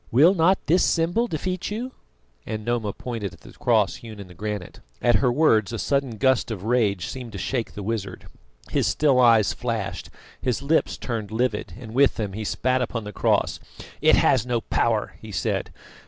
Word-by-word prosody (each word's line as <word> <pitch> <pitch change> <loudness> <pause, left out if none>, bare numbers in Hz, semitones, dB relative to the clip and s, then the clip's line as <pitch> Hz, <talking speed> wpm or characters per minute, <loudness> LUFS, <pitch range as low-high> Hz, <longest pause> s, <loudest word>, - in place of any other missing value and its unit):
"Will 150 +10 +6
not 185 +1 +4
this 175 +4 +3
symbol 175 +8 +1
defeat 185 +1 -3
you?" 235 +5 -4 0.5
and 110 -1 -5
Noma 120 -3 -1
pointed 110 -4 -5
at - - -24
the - - -13
cross - - +1
hewn 110 -3 -10
in 100 - -8
the 90 - -13
granite. 105 0 -5 0.2
At 120 - +4
her 125 -3 +2
words 120 -7 +3
a 115 - -3
sudden 135 -1 -1
gust 130 +2 +2
of 105 -5 -5
rage 105 -6 +1
seemed 125 -4 -7
to - - -5
shake 120 +4 -2
the 105 - -5
wizard. 100 -3 -4 0.5
His - - +1
still 140 -4 +3
eyes 115 -4 +5
flashed, 115 -5 -4 0.3
his 125 +1 -1
lips 155 +3 +1
turned 110 -4 -4
livid, 110 -1 -1
and 110 -3 -9
with 135 +2 +4
them 105 -4 -3
he 110 +2 -4
spat 130 +4 0
upon 115 -2 -3
the 105 0 -7
cross. - - +1 0.4
"It - - +6
has 130 -5 +3
no 120 -2 -1
power," 110 -2 0
he 110 - -9
said. 90 -3 -2
115 Hz, 190 wpm, -24 LUFS, 105-135 Hz, 0.5 s, Will